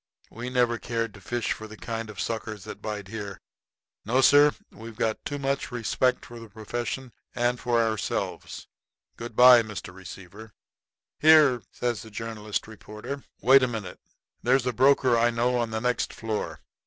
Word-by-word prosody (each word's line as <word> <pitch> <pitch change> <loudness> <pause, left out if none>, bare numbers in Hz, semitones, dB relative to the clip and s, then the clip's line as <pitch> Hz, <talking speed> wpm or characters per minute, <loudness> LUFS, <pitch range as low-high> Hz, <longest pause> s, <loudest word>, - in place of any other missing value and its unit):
We 120 +2 -6
never 120 -2 +1
cared 115 -2 -3
to 100 - -14
fish 120 +4 -2
for 110 - -4
the 110 0 -12
kind 115 -1 -5
of 105 -2 -10
suckers 110 -3 -4
that - - -9
bite 105 -3 -5
here. 100 -5 -6 0.6
No, 120 +5 +1
sir. 145 +2 +6 0.2
We 115 +2 -10
got 110 0 -2
too 145 - -3
much 140 -1 -2
respect 125 +2 0
for 120 0 -10
the 115 -1 -11
profession 120 +4 -5 0.2
and 120 0 0
for 120 -2 +1
ourselves. 110 -4 -2 0.5
Good 120 -1 -8
by 125 0 +9
to 110 - -8
you, - - -8
Mr. 90 -1 -7
Receiver." 95 +3 -11 0.7
"Here!" 150 -6 +6
says 120 -4 -2
the 110 - -11
journalist 110 -1 -4
reporter; 110 +5 -8 0.2
"wait 135 +2 +7
a 130 - +2
minute. 110 -7 -6 0.4
There's 130 +1 +2
a 125 - 0
broker 130 0 +4
I 120 +1 +4
know 120 +1 +1
on 120 -1 -1
the 110 0 -2
next 125 +1 -1
floor. 110 -2 -4
115 Hz, 175 wpm, -26 LUFS, 110-125 Hz, 0.7 s, by